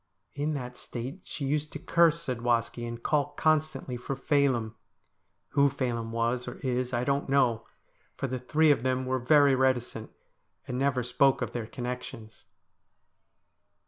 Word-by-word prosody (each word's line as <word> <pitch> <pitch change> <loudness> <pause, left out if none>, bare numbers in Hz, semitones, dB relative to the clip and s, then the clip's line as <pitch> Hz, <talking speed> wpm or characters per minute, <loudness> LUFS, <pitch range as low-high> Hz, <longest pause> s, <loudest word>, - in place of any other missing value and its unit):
In 150 +2 -1
that 125 -2 -6
state 130 +9 -6
she 140 - -4
used 150 +2 -1
to - - -4
curse 165 +1 +3
Zadwaski, 120 -1 -1
and 115 0 -7
call 150 -2 +1
constantly 155 -5 0
for 130 +3 -4
Phelim. 135 -5 +1 0.8
Who 140 0 +4
Phelim 120 -4 -2
was 120 +2 -1
or 125 - -5
is 125 -1 -1
I 120 -1 0
don't 140 +1 0
know, 120 -5 +2 0.5
for - - -2
the 130 -1 -3
three 150 +5 +3
of 140 - +2
them 130 0 0
were 130 0 0
very 140 +2 +5
reticent, 125 -4 0 0.6
and 125 0 -3
never 135 -2 +1
spoke 125 +3 +3
of - - -4
their 115 -3 -4
connections. 125 -3 -7
130 Hz, 150 wpm, -28 LUFS, 120-140 Hz, 0.8 s, very